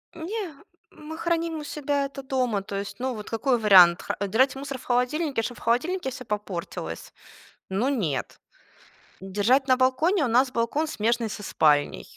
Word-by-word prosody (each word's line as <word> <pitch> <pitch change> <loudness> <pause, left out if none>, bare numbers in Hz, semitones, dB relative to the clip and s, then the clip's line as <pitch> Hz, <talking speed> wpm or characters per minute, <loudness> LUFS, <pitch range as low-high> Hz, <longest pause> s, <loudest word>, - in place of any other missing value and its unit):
Не, 350 0 -5 0.4
мы 315 +1 -9
храним 335 -1 -1
у - - -7
себя 290 -1 -1
это 275 0 -8
дома, 250 -6 0
то 200 +1 -7
есть, 200 0 -6
ну 260 +1 -2
вот 210 -2 -8
какой 245 +3 +1
вариант? 185 -4 +7
Хра - - -3
э, 200 - -1
держать 255 +8 +2
мусор 275 0 -5
в - - -14
холодильнике, 255 +3 0
чтобы 240 +2 -5
в - - -14
холодильнике 290 +8 0
всё 255 0 -8
попортилось? 205 -5 -5 0.6
Ну 205 +8 0
нет. 185 - -2 0.8
Держать 210 +8 +1
на 255 - +5
балконе? 290 +7 +2
У - - 0
нас 250 +3 +3
балкон, 235 +6 0
смежный 235 -3 0
со 210 - -7
спальней. 145 - +1
255 Hz, 175 wpm, -25 LUFS, 210-285 Hz, 0.8 s, вариант